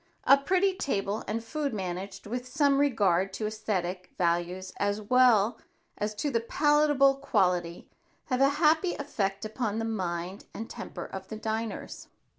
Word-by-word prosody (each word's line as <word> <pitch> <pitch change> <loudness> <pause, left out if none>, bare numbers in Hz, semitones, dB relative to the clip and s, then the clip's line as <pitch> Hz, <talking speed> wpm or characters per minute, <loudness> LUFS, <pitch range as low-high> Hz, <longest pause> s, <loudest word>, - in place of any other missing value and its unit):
A 275 - +8
pretty 370 +7 +2
table 205 - -2
and 225 +2 -2
food 280 +1 -3
managed 190 0 -5
with 245 +4 -4
some 280 +1 +2
regard 195 -9 +2
to 215 - -3
esthetic 195 -4 -3
values 175 +2 -1
as 205 +1 0
well 230 -1 +4 0.4
as 210 +1 -3
to 285 +7 -1
the 230 - +2
palatable 290 +2 +3
quality, 180 -10 0 0.4
have 255 -1 -1
a 275 - +6
happy 320 +3 +3
effect 200 -9 -2
upon 215 -1 -2
the 225 - -1
mind 185 -3 -3
and 225 - -5
temper - - -7
of 190 0 -8
the 220 - -6
diners. 220 0 -4
220 Hz, 150 wpm, -28 LUFS, 195-275 Hz, 0.4 s, A